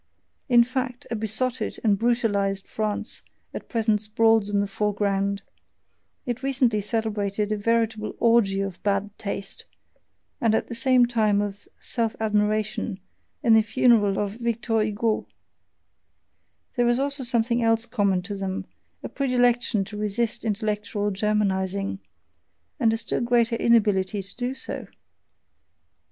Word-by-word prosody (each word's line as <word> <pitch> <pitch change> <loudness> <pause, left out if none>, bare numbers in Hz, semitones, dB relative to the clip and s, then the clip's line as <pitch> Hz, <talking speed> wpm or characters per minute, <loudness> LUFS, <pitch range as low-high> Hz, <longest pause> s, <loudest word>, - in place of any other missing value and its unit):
In 240 -1 +7
fact, 255 0 -4
a - - 0
besotted 230 +4 -2
and 210 -3 +4
brutalized 200 -4 0
France 215 -1 -2 0.3
at - - -7
present 220 -3 +1
sprawls 220 0 +3
in 205 0 +1
the 200 - +1
foreground 200 -1 -1 0.8
it 245 -1 -3
recently 255 -5 +1
celebrated 210 -1 -2
a - - +2
veritable 220 0 0
orgy 225 -4 +3
of 195 -2 -5
bad 200 0 -1
taste, 200 -1 -5 0.8
and 225 -2 +3
at - - -1
the - - -4
same 250 +1 +4
time 215 -4 +2
of 205 0 -4
self 230 -2 -1
admiration, 210 -1 0 0.4
at 230 - +5
the 220 - +7
funeral 220 -3 +3
of 205 +1 -2
Victor 230 -1 0
Hugo. 215 +1 0 1.5
There 245 -1 +2
is 240 - +3
also 280 +1 0
something 235 -1 +1
else 225 0 +2
common 200 -6 +1
to 205 +3 -5
them: 195 -1 -4 0.4
a - - -3
predilection 245 -5 +1
to 210 +2 -8
resist 220 +3 -1
intellectual 210 -1 -1
Germanizing 195 -1 0 0.8
and 230 -4 +4
a 225 - 0
still 225 - -1
greater 235 -1 +2
inability 205 -4 +2
to 195 - -8
do 250 +2 -3
so! 265 - -6
220 Hz, 135 wpm, -25 LUFS, 205-235 Hz, 1.5 s, In